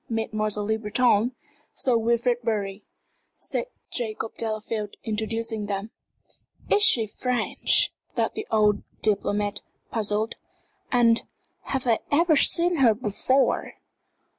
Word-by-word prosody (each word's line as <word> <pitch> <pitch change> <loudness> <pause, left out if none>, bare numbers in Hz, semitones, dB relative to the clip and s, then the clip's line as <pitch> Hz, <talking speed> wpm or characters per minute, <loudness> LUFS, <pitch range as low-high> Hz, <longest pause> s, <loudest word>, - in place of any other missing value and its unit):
"Mademoiselle 215 -2 -1
Le 220 +1 0
Breton 225 +1 +2 0.4
Sir 255 -3 +1
Wilfrid 235 +1 +1
Bury," 205 -3 -2 0.5
said - - -3 0.2
Jacob 220 -2 -3
Delafield, 215 -1 -4
introducing 220 0 -2
them. 200 +2 -3 0.8
"Is 415 - +5
she 240 - +5
French?" 250 +3 +1 0.2
thought - - 0
the 425 - -5
old 210 -2 +3 0.2
diplomat, 205 -1 0 0.3
puzzled. 215 0 -1 0.5
"And 235 -3 +4 0.4
have 265 -2 -2
I 230 -2 +3
ever 320 +2 +4
seen 345 +4 +4
her 240 -6 +5
before?" 255 +5 0
225 Hz, 110 wpm, -25 LUFS, 210-245 Hz, 0.8 s, Is